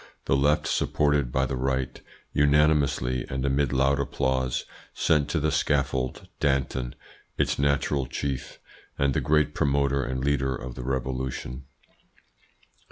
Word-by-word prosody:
The - - +2
Left, 70 +2 +2
supported 75 -4 +1
by 65 +1 +1
the 65 - -2
Right, 65 0 -2 0.3
unanimously 70 -4 +3
and 65 0 -2
amid 70 -1 +1
loud 70 +1 +2
applause, 65 -2 -1 0.3
sent 75 -3 +2
to 80 - 0
the 75 +1 +1
scaffold 70 -3 0
Danton, 65 -3 0 0.4
its - - +1
natural 70 -1 +1
chief, 70 +1 -4 0.4
and 70 -1 +2
the - - +1
great 75 0 +2
promoter 70 -1 +1
and 65 +1 -3
leader 65 -2 +1
of 60 0 -7
the - - -7
Revolution. 65 0 -3
70 Hz, 130 wpm, -26 LUFS, 65-70 Hz, 0.4 s, unanimously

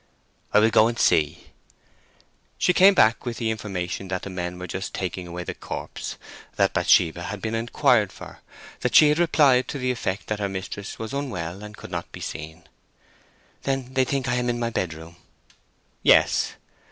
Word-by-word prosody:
"I - - +4
will 110 +2 +5
go 110 - +5
and 120 0 -3
see." 75 -9 +1 1.1
She 180 - +3
came 195 +2 +6
back 110 -7 +4
with 120 -2 -4
the 110 -1 -1
information 95 -4 -4
that 95 0 -3
the 100 - -6
men 90 -1 -4
were 90 - -6
just 95 +3 -5
taking 90 -1 -4
away 90 +1 -6
the - - -5
corpse; - - -6 0.4
that - - +2
Bathsheba 85 +1 +3
had 100 +1 -5
been 110 +2 -3
inquired 115 +1 +2
for; - - -11 0.4
that - - -1
she 150 - +8
had 150 +2 +2
replied 145 -7 +4
to - - -4
the 130 -1 0
effect 105 -5 -3
that 105 -1 -3
her 100 -1 -1
mistress 95 +1 -6
was 110 +1 -6
unwell 95 -10 -4
and 105 0 -10
could - - -11
not - - -5
be - - -9
seen. 80 +2 -7 1.0
"Then 135 -2 -3
they 130 0 +3
think 135 0 -2
I 120 +1 +1
am 125 0 0
in 120 - 0
my 115 -1 -1
bedroom?" 85 -4 -4 0.8
"Yes." - - +4
105 Hz, 185 wpm, -24 LUFS, 90-125 Hz, 1.1 s, she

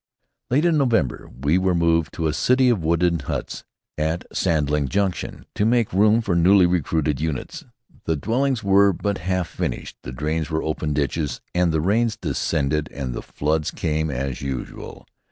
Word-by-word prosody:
Late 145 +7 +2
in 165 -3 +3
November 115 - 0
we 75 +6 +3
were 95 -1 +1
moved 85 -1 +2
to 80 - -2
a 75 - +1
city 125 +8 +3
of 110 -9 +1
wooden 85 +1 +2
huts 70 - -5 0.4
at 80 +3 -1
Sandling 75 -4 +1
Junction, 95 +1 -2
to - - 0
make 115 -2 +2
room 105 +4 +4
for 100 -5 -1
newly 90 +2 +5
recruited 80 -4 0
units. 80 -4 -4 0.4
The 80 - +1
dwellings 120 - 0
were 100 0 +5
but 100 +3 -2
half 90 0 -1
finished, 80 - -4
the 60 - -7
drains 75 +4 -2
were 80 0 -1
open 75 -1 -2
ditches, 70 -1 -1
and 90 -1 +2
the 80 -1 +1
rains 110 +5 +1
descended 75 -7 -1
and 65 -3 -4
the - - -5
floods 75 +1 -1
came 80 0 -1
as 65 -1 -3
usual. 65 -2 -6
85 Hz, 170 wpm, -22 LUFS, 75-100 Hz, 0.4 s, newly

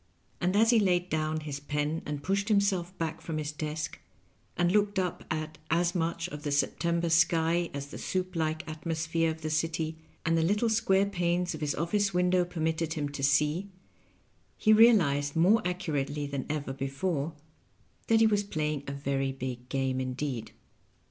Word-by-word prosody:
And 180 +2 +1
as 225 +3 +5
he 235 - +5
laid 180 -3 +1
down 155 0 0
his 145 -2 -5
pen 150 +2 -2
and 145 -1 -4
pushed 200 +4 0
him 210 -2 +5
self 185 -2 -1
back 160 -1 -3
from 160 -2 -4
his 150 -1 -2
desk, 155 +1 -4 0.6
and 175 0 +3
looked 205 0 +2
up 180 -2 -1
at 155 0 -4
as 170 +1 +2
much 170 0 -1
of 150 -3 -7
the 145 -1 -3
September 170 +4 +1
sky 165 +1 +3
as 140 -1 -5
the - - -8
soup 185 -1 -2
like 155 0 -1
atmosphere 165 +1 -1
of 160 0 -5
the 155 0 -3
city 160 0 -1 0.3
and 165 0 +3
the 165 - +3
little 210 +7 +2
square 195 -3 +3
panes 175 -2 0
of 155 - -7
his 150 -1 0
office 195 +4 0
window 180 0 +3
permitted 160 -1 -1
him 145 -2 -2
to 140 -1 -6
see, 150 +7 +2 0.9
he 215 - +4
realized 165 -12 +5
more 190 +7 +5
accurately 150 -5 -2
than 140 -2 -4
ever 145 -3 -2
before 140 +3 -2 0.7
that 225 0 +4
he - - +7
was 205 -2 +3
playing 155 -6 -2
a - - -3
very 135 -1 -1
big 125 -2 -6
game 130 -1 0
indeed. 130 -2 -3
160 Hz, 175 wpm, -29 LUFS, 150-180 Hz, 0.9 s, he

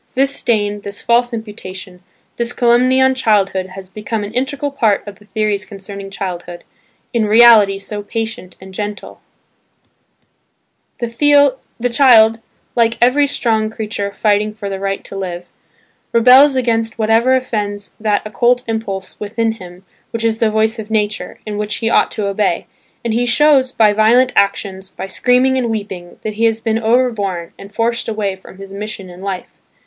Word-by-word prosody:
This 275 +2 +2
stain, 205 -2 0
this 200 0 -7
false 240 +1 +2
imputation, 190 -5 -8 0.4
this 235 0 -2
calumny 250 +2 +3
on 265 0 +4
childhood 200 -6 +1
has 190 0 -10
become 210 +2 -4
an 205 +2 -7
integral 275 +3 -2
part 225 -7 +1
of 200 -2 -9
the 210 - -19
theories 210 -1 -1
concerning 200 -1 -9
childhood, 175 -3 -6 0.5
in 225 -3 +1
reality 215 -3 +6
so 205 +1 -6
patient 220 -3 -5
and 190 0 -12
gentle. 205 +1 -6 1.8
The 285 +3 +3 0.4
child, 230 -3 +5 0.4
like 230 -1 +2
every 265 +4 +4
strong 220 -5 0
creature 215 -2 -4
fighting 210 +1 0
for 200 -2 -6
the 195 - -4
right 195 0 -3
to - - -10
live, 180 -2 -5 0.7
rebels 255 +4 +6
against 230 -3 0
whatever 225 +3 +3
offends 210 -5 -2
that 210 -1 0
occult 245 +3 +1
impulse 200 -4 -4
within 225 +2 -1
him 185 -3 -12 0.2
which 230 0 -4
is 225 0 0
the 225 - +3
voice 220 +1 0
of 215 0 -7
nature, 215 -1 -2
and 210 -1 -4
which 210 0 -2
he 225 -1 -1
ought - - +3
to 210 - -3
obey; 200 -3 0 0.4
and 230 - 0
he 245 +2 0
shows 270 0 +4
by 215 -4 +3
violent 235 +4 +4
actions, 195 -1 0
by - - -7
screaming 250 +6 +2
and 240 -2 -1
weeping 200 -5 -5
that 215 - -3
he 225 +2 0
has 225 -1 +1
been 225 -1 -1
overborne 220 -7 0
and 200 +1 -12
forced 230 +1 -1
away 210 -3 -2
from 190 0 -15
his 195 0 -10
mission 205 -1 -6
in 180 0 -12
life. 195 -2 -5
215 Hz, 165 wpm, -17 LUFS, 200-235 Hz, 1.8 s, reality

